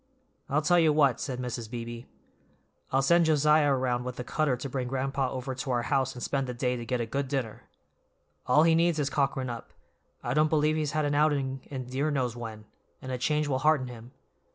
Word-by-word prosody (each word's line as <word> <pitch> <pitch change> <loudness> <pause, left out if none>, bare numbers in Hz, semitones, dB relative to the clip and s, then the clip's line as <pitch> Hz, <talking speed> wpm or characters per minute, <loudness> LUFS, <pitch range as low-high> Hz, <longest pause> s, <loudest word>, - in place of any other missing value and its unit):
"I 145 - +2
tell 175 +4 +4
you 160 -2 +4
what," 140 -5 +3
said 130 -3 -3
Mrs. 120 -3 -4
Beebe. 120 0 -6 0.9
"I'll 135 +1 +2
send 170 +4 +4
Josiah 150 -1 +4
around 125 -2 0
with 125 0 -5
the 125 - -5
cutter 140 0 0
to 140 - -5
bring 130 -1 -3
grand'pa 135 +1 -1
over 130 +1 -4
to 130 +2 -5
our 120 -2 +1
house 135 -1 0
to 125 - -9
spend 135 0 -1
the 125 - -4
day 125 +1 0
and 120 -2 -5
get 125 +1 0
a 120 - -1
good 135 +4 -2
dinner. 130 -5 -4 0.8
All 150 +5 +5
he 165 0 +5
needs 165 0 +3
is 140 -2 -1
cockerin' 135 -2 0
up; 115 - -9 0.5
I 120 - -1
don't 155 +2 +3
believe 155 0 +2
he's 155 -1 -1
had 155 -1 +1
an 145 - 0
outing 140 -3 +1
in 130 -3 -5
dear 135 +5 -1
knows 130 -5 -1
when, 110 -3 -7 0.3
and 130 - -7
a 125 - -3
change 150 +3 +1
will 130 -2 0
hearten 145 -3 +2
him. 120 0 -11
135 Hz, 220 wpm, -28 LUFS, 125-150 Hz, 0.9 s, All